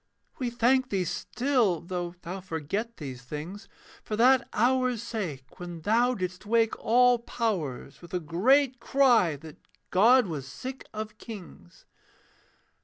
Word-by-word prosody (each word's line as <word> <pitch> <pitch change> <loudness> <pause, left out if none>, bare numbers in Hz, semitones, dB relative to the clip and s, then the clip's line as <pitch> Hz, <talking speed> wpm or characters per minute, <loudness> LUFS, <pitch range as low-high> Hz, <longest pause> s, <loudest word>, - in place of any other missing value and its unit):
We 250 -2 -1
thank 250 +2 +2
thee 190 -3 0
still, 240 - 0
though 175 0 -5
thou 185 +3 -5
forget 190 +7 -4
these 130 -5 -7
things, 155 - -7 0.3
For 215 - -4
that 255 +3 +4
hour's 250 0 +1
sake 170 - -5
when 175 -2 -7
thou 235 +7 +2
didst 185 -2 -4
wake 225 +1 +2
all 245 +1 +4
powers 190 - -3
With 175 - -13
a - - +1
great 250 - +2
cry 240 - +3
that 155 +2 -12 0.3
God 240 +6 +6
was 150 -7 -5
sick 260 - -8
of 215 0 -6
kings. 185 - -11
215 Hz, 135 wpm, -28 LUFS, 170-245 Hz, 0.3 s, God